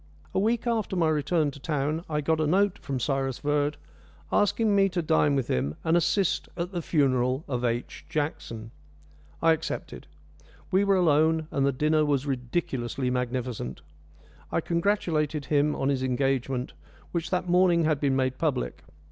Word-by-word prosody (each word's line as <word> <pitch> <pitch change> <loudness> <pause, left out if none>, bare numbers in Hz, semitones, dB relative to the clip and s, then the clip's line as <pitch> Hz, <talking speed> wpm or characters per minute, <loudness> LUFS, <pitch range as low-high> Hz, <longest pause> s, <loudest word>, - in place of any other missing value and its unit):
A - - +1
week 225 +4 +1
after 225 -5 0
my 165 -3 +2
return 155 0 +1
to 140 - -12
town 150 +2 -1
I 150 -1 0
got 160 +2 +1
a 155 - +1
note 195 +4 +2
from 135 -2 -3
Cyrus 135 0 -1
Verd, 145 0 0 0.5
asking 205 +1 +2
me 195 -1 +4
to 180 -1 -1
dine 150 -2 +3
with 135 -3 0
him 70 +4 -1
and 165 +1 +2
"assist 175 +2 +1
at 175 +2 -3
the 175 -3 -3
funeral 130 -3 +1
of 125 -3 -2
H. 120 0 -2
Jackson." 145 -8 -3 0.7
I 165 - +6
accepted. 160 0 -5 0.6
We 190 +1 +4
were 200 -1 +3
alone, 160 -2 +3
and 140 -1 +1
the - - +3
dinner 155 +3 +2
was 145 -2 +1
ridiculously 125 -1 -2
magnificent. 125 -1 -3 0.7
I - - +1
congratulated 165 -5 0
him 150 0 +2
on 135 - 0
his 135 -2 0
engagement, 130 +1 -1 0.4
which 170 -1 -2
that 180 -1 -1
morning 175 -1 +4
had 155 -2 +1
been 140 -2 +1
made 130 -1 0
public. - - -1
150 Hz, 165 wpm, -27 LUFS, 135-170 Hz, 0.7 s, I